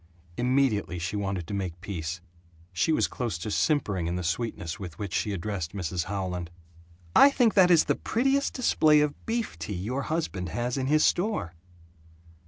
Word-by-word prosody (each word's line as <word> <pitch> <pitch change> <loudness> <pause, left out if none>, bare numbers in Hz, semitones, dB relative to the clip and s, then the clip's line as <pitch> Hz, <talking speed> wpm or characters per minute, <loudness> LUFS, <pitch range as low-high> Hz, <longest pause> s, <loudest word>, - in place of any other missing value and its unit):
Immediately 120 -7 +1
she 90 +4 -3
wanted 95 -4 -2
to 100 - -7
make 90 -4 -3
peace. 85 -3 -5 0.5
She 90 - +1
was 155 - +2
close 115 -8 -3
to 95 +6 -5
simpering 100 - +1
in 85 - -2
the 90 - -3
sweetness 85 -2 -3
with 90 -6 -8
which 100 -3 -5
she 105 - 0
addressed 95 -3 -4
Mrs 90 -3 -2
Howland: 90 -3 -3 0.7
"I 280 - +9
think 245 -5 +3
that 185 -3 +6
is 170 -3 +6
the - - +2
prettiest 270 +4 0
display 155 - +4
of 150 -1 -2
beef 230 0 -2
tea 105 - -4
your 115 +10 -2
husband 140 - -2
has 120 +7 -2
in 135 -1 -1
his 155 +2 +4
store." 180 - 0
105 Hz, 175 wpm, -27 LUFS, 90-150 Hz, 0.7 s, I